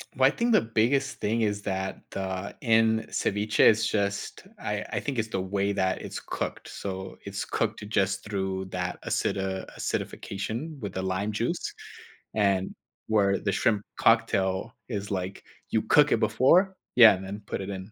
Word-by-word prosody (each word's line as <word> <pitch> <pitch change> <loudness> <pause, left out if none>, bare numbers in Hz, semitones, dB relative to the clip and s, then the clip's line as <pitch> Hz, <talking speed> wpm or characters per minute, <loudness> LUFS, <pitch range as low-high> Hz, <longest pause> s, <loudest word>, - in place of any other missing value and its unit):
Well, - - +5
I - - +3
think 235 0 +1
the - - +6
biggest 120 +5 +1
thing 115 +3 0
is 105 -1 0
that 95 -1 -3
the 95 0 -4
in 110 -1 +3
ceviche, 105 +1 -1
it's 110 0 +6
just 100 - -2
I 105 0 -3
I - - +1
think 135 -5 -3
it's 115 - 0
the 95 - -1
way 100 +1 0
that 95 -1 0
it's - - -6
cooked. - - -5
So, 95 -1 -6
it's 100 0 -3
cooked 110 -1 -2
just 95 -2 +1
through 95 -2 -2
that 90 0 -3
acid - - 0
uh, 95 -1 -2
acidification 115 +10 -4
with 100 -3 -5
the 95 - -2
lime 95 +3 -1
juice, - - -2 0.6
and 100 -3 +1 0.3
where 100 -3 +3
the 100 - -1
shrimp 105 +1 +1 0.2
cocktail 110 -2 +2 0.2
is 105 -3 -4
like, 95 0 -3 0.3
you - - +2
cook - - +5
it - - +2
before 185 +9 +4 0.2
Yeah, 115 -4 +10
and 95 - -8
then 100 +2 -6
put - - -3
it 95 - -5
in. 95 +1 -6
100 Hz, 175 wpm, -27 LUFS, 95-110 Hz, 0.6 s, Yeah